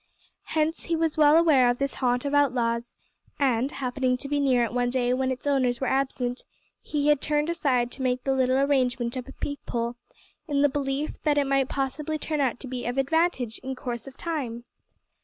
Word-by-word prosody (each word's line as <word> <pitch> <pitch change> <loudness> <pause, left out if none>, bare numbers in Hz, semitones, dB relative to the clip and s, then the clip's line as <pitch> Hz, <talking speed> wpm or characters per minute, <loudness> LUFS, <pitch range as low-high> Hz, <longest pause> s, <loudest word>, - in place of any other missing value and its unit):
Hence 315 +1 0
he 335 - 0
was 325 -1 0
well 300 0 +6
aware 295 -7 +5
of 245 - +1
this 275 +1 -1
haunt 250 0 0
of 280 - -2
outlaws, 240 -4 +1 0.4
and, 265 -2 +1
happening 255 -2 -1
to 275 - -7
be 290 +1 0
near 260 -4 +3
it 230 - -2
one 245 0 +1
day 250 -1 +1
when 260 +1 0
its 260 +1 -4
owners 255 -4 +1
were 265 - -1
absent, 260 -2 -1 0.4
he 295 -1 0
had 295 -2 +3
turned 300 +2 0
aside 255 -7 +1
to 265 - -6
make 250 -1 0
the 270 - +1
little 260 0 +2
arrangement 255 -3 +1
of 255 0 -5
a - - -9
peep 285 0 -4
hole, 235 0 -2 0.5
in 285 -2 +1
the 290 - +5
belief 275 +1 -3
that 295 -1 +1
it 285 - +3
might 275 -1 +1
possibly 285 +3 -2
turn 305 0 -2
out 250 -3 0
to 265 - -7
be 250 -1 -5
of 245 +2 -3
advantage 270 -4 +1
in 265 0 -5
course 245 -2 -5
of 270 0 -11
time! 260 -9 -4
265 Hz, 210 wpm, -26 LUFS, 245-290 Hz, 0.5 s, well